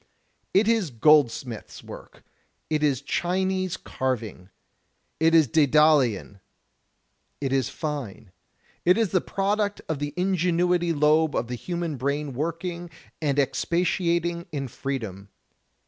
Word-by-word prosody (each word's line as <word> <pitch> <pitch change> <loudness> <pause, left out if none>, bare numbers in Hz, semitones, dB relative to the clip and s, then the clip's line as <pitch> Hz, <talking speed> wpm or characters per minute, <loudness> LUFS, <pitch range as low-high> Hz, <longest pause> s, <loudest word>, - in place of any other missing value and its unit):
It 205 +3 +3
is 225 -7 +2
goldsmith's 125 -3 +2
work; - - -12 0.5
it 155 -1 +1
is 140 -3 +1
Chinese 185 +3 -1
carving; 115 -8 -4 0.7
it 165 +1 +4
is 160 -2 +6
Daedalian; 140 -7 +3 1.0
it 135 -2 -2
is 135 -1 +1
fine. 135 - -5 0.5
It 180 +3 +4
is 225 -4 +2
the 185 -1 +2
product 205 +1 -1
of 160 -3 -2
the 145 0 -4
ingenuity 180 -1 +1
lobe 155 0 +3
of 120 - -1
the 125 - -3
hiunan 170 +2 -4
brain 140 +2 -2
working 170 +5 -4 0.3
and 145 -3 0
expatiating 170 +3 0
in 135 -4 -4
freedom. 110 -8 -5
155 Hz, 115 wpm, -25 LUFS, 135-175 Hz, 1.0 s, is